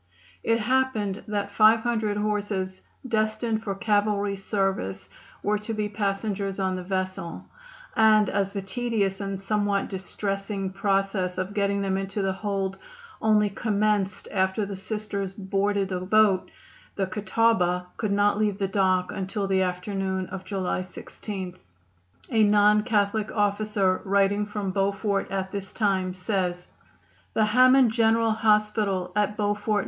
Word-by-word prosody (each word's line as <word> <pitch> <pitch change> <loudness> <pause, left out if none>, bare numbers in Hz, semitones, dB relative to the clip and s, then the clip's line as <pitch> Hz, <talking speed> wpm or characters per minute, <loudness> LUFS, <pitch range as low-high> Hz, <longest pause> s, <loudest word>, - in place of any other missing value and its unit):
It 230 0 +2
happened 220 -4 0
that 205 -1 -2
500 220 0 +3
horses, 205 -3 -2 0.3
destined 220 0 0
for 200 -3 -3
cavalry 205 0 +1
service, 195 - -2 0.3
were 210 0 +1
to 220 +1 -5
be 210 -1 -1
passengers 200 -1 -2
on 190 -1 0
the 185 - -4
vessel, 185 -2 -3 0.5
and 215 -2 +5
as 195 0 0
the 200 -1 -5
tedious 200 -1 -1
and 195 -1 -3
somewhat 205 0 0
distressing 195 0 -3
process 195 -2 0
of 185 +2 -3
getting 200 -1 0
them 190 -1 0
into 195 +1 -3
the 190 0 0
hold 195 -1 -3 0.4
only 210 -2 +3
commenced 205 -2 0
after 190 +1 +1
the 200 0 -5
Sisters 200 -1 -4
boarded 200 0 0
the 185 -1 -2
boat 195 0 +3 0.5
the 195 - 0
Catawaba 190 -2 +1
could 215 -3 -1
not 205 +1 +2
leave 210 -2 +1
the 195 -2 0
dock 185 -2 +1
until 195 +2 -3
the 190 -1 +2
afternoon 190 +1 -2
of 190 0 -6
July 185 -1 -2
16. 185 0 -7 0.8
A 225 -2 +3
non 210 0 +5
Catholic 210 -1 0
officer 205 -2 +1
writing 200 +1 +2
from 205 -2 -3
Beaufort 200 +1 0
at 190 -1 -3
this 200 -2 -5
time 190 -4 0
says: 180 -2 -2 0.7
"The 215 - +4
Hammond 255 +2 +5
General 225 0 +3
Hospital, 210 -4 +1
at 210 0 +1
Beaufort, 210 0 0
N. - - +3
200 Hz, 140 wpm, -26 LUFS, 190-215 Hz, 0.8 s, and